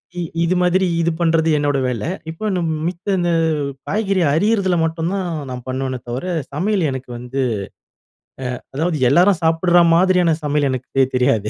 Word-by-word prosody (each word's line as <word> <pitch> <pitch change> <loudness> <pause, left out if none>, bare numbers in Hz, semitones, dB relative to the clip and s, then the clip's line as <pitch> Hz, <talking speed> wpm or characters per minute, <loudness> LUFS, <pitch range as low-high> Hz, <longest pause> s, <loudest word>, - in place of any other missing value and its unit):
அ - - -10
இ - - -1 0.2
இது 180 +2 +1
மாதிரி 185 +1 +2 0.2
இது 170 0 +1
பண்றது 165 -1 +2
என்னோட 145 -1 +1
வேல. 120 -4 -3 0.3
இப்ப 210 +6 -4
நம் 170 -2 -1 0.2
மித்த 185 +3 -2
இந்த 175 -1 +1 0.6
காய்கறி 195 -2 0
அரியதுல 195 +1 +2
மட்டும் 165 +2 -2
தான் 190 -2 -2 0.2
நான் 125 -1 -7
பண்ணுவேனே 130 -1 -3
தவிர, 125 +7 -4 0.3
சமையல் 185 0 0
எனக்கு 130 -1 -6
வந்து 125 +3 -3 1.2
அ - - -25
அதாவது 160 +1 0
எல்லாரும் 180 0 +4
சாப்பிடுற 175 +2 +4
மாதிரியான 180 -2 +3
சமையல் 145 -1 +1
எனக்கு 130 -1 -4
தெ 135 - +6
தெரியாது. 115 -5 +1
165 Hz, 160 wpm, -19 LUFS, 135-180 Hz, 1.2 s, தெ